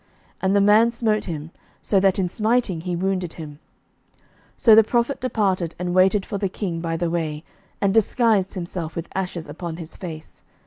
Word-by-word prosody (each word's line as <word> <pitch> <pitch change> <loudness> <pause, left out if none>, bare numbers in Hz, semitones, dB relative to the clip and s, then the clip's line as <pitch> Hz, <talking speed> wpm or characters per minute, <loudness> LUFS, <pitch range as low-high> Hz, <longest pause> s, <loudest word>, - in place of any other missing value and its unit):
And 190 +1 +2
the 200 - +5
man 210 +3 +5
smote 225 -3 0
him, 160 -2 -6 0.3
so 200 - +2
that 190 -1 +3
in 190 -2 +1
smiting 215 -2 0
he 175 0 -3
wounded 185 -1 -2
him. 150 -3 -9 0.6
11:020:038 - - -36 0.4
So 225 - +6
the 220 +1 +8
prophet 240 +5 0
departed, 190 -9 0
and 180 0 -3
waited 190 +2 +3
for 200 - -4
the 195 - -1
king 180 -3 -4
by 165 -1 -2
the 170 0 -1
way, 155 -3 -2 0.4
and 195 -1 +1
disguised 220 -3 +2
himself 170 -3 -5
with 170 0 -5
ashes 180 -4 -4
upon 160 +2 -6
his 165 -2 -9
face. 160 -4 -9
185 Hz, 185 wpm, -22 LUFS, 170-210 Hz, 0.6 s, the